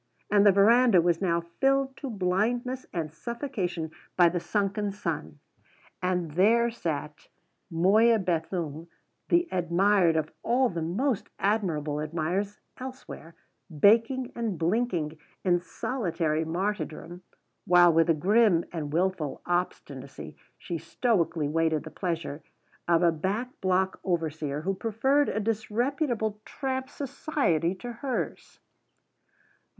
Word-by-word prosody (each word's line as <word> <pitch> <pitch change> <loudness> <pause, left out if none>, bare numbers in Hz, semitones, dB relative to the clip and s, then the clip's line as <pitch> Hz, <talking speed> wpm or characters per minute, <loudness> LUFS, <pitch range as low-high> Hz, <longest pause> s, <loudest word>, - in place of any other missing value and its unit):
And 205 -1 +5
the - - +8
verandah 220 +1 +5
was 170 0 +2
now 170 -3 +1 0.2
filled 270 0 +2
to 275 - -5
blindness 230 +6 -1
and 160 -4 -4
suffocation 180 - -4 0.3
by 175 -2 +6
the 175 +1 -2
sunken 200 +3 -1
sun. 160 - -4 0.6
And 180 -3 -1
there 230 +8 +3
sat 150 -8 -5 0.4
Moya 205 +7 +4
Bethune, 165 -3 -2 0.4
the 345 0 +3
admired 180 0 +3
of 155 -1 -1
all 250 +2 +2
the 170 -2 -4
most 205 - -1
admirable 165 -8 0
admirers 175 +6 -2 0.2
elsewhere, 255 -10 -9 0.3
baking 225 - +3
and 225 -6 -2
blinking 170 -4 -1 0.3
in 175 -1 +3
solitary 170 -6 -2
martyrdom, 175 -1 -3 0.5
while, 175 -1 +6
with 165 +1 +3
a 165 - +5
grim 195 +1 +3
and 150 -4 -4
wilful 175 -3 -1
obstinacy, 175 +1 -4 0.2
she 170 -3 -5
stoically 170 - 0
waited 160 0 +1
the 160 - -9
pleasure 165 -5 -3 0.5
of 170 0 +3
a 170 - +5
back 195 +10 -2
block 185 0 +1
overseer 155 -5 -2
who 190 +4 -1
preferred 235 +8 +1
a - - -1
disreputable 220 +1 -1
tramp's 265 -1 -4
society 265 - -1
to 240 +6 -7
hers! 255 +2 -4
185 Hz, 120 wpm, -27 LUFS, 165-230 Hz, 0.6 s, the